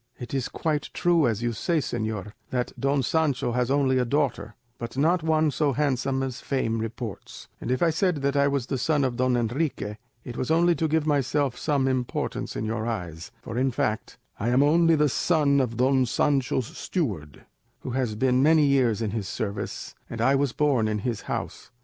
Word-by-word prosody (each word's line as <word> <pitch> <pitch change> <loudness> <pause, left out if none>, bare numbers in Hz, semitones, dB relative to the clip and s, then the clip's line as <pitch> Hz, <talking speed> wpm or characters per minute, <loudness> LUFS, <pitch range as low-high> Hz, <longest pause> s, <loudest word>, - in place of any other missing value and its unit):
"It 120 - -8
is 135 -2 -1
quite 155 -2 -2
true, 170 -5 +3
as 115 0 -1
you 120 -1 0
say, 170 - 0
señor, 110 -7 -3 0.2
that 125 -1 -1
Don 140 0 +1
Sancho 145 -2 +1
has 125 0 0
only 135 -2 +2
a - - +2
daughter, 125 -5 -1 0.2
but 120 +2 -6
not 165 +5 +3
one 155 -1 +2
so 145 -1 +1
handsome 135 -1 0
as 130 -1 -4
fame 115 -5 -1
reports; 115 -2 -6
and - - -4
if 130 +6 +1
I 165 - +4
said 180 +2 +1
that 140 0 +1
I 140 0 +4
was 140 -3 0
the 135 0 -3
son 150 +1 +1
of 130 -2 0
Don 130 0 +2
Enrique 120 -3 -2 0.3
it 120 -1 -7
was 130 - -2
only 170 +2 +4
to 160 -1 0
give 155 0 +1
myself 140 -2 +1
some 140 -2 0
importance 130 -2 -2
in 110 - -2
your 110 +1 -2
eyes; 90 -8 -5
for 115 +2 -4
in 135 +1 +2
fact, 110 -3 -2 0.2
I 115 - 0
am 130 +3 +4
only 165 +2 +4
the 150 -1 +3
son 140 +3 +2
of 115 -3 -2
Don 130 0 +3
Sancho's 130 -2 0
steward, 95 - -4 0.4
who 130 - -5
has 120 -4 -1
been 125 +3 +2
many 155 +1 +5
years 125 -6 +2
in 105 - -1
his 105 -3 -3
service, 100 -1 -4 0.2
and 115 - -6
I 125 +4 +3
was 140 -1 +1
born 135 -6 +2
in 105 0 -1
his 120 -4 -2
house. - - -4
130 Hz, 200 wpm, -26 LUFS, 115-145 Hz, 0.4 s, many